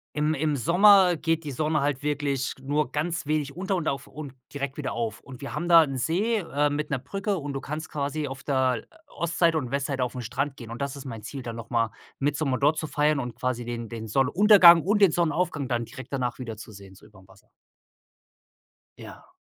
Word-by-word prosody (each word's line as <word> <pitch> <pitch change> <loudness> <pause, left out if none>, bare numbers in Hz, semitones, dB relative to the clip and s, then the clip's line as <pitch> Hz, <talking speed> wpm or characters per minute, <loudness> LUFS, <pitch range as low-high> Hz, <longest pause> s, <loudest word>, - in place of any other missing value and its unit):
im 150 +1 +1
im 150 0 0
Sommer 180 - +5
geht 165 0 0
die 145 - -5
Sonne 150 +2 0
halt 140 -1 -1
wirklich 145 -2 -1
nur 145 0 -1
ganz 160 +2 -2
wenig 150 -2 -1
unter 190 +2 -1
und 170 -4 -2
auf 140 0 -2
und 145 -4 -9 0.2
direkt 140 -1 -4
wieder 145 -3 -3
auf. 115 -3 -3
Und 130 -3 -12
wir 140 - -6
haben 175 - -3
da 165 -1 +8
'n 135 -3 -4
See, 195 - 0
äh, 150 -5 0
mit 150 +1 -2
'ner 140 - 0
Brücke 195 - -3
und 145 -2 -5
du 135 - -4
kannst 155 +3 -5
quasi 145 +1 -3
auf 135 0 -8
der 130 -4 0 0.2
Ostseite 170 -4 +1
und 125 - -5
Westseite 140 -1 -1
auf'n 125 0 -4
Strand 135 +5 -3
gehen. 115 -2 -9
Und 120 - -7
das 140 0 -3
ist 140 - -9
mein 115 -5 -7
Ziel, 130 +4 -7
dann 115 -1 -6
noch 115 -1 -9
mal 115 -3 +1 0.3
Mittsommer 140 -1 0
dort 150 +3 +2
zu 155 - -3
feiern 150 0 +1
und 125 -3 -5
quasi 125 -2 -2
den 120 -1 -5
den 110 -1 -7
Sonnenuntergang 170 - +7
und 205 +5 +1
den 195 - +7
Sonnenaufgang 165 -4 0
dann 120 -1 -1
direkt 130 +2 -11
danach 130 -3 -2
wiederzusehen, 105 -5 -9
so - - -18
überm 95 -2 -18
Wasser. 95 - -21 1.5
Ja. - - -12
140 Hz, 210 wpm, -26 LUFS, 125-155 Hz, 1.5 s, da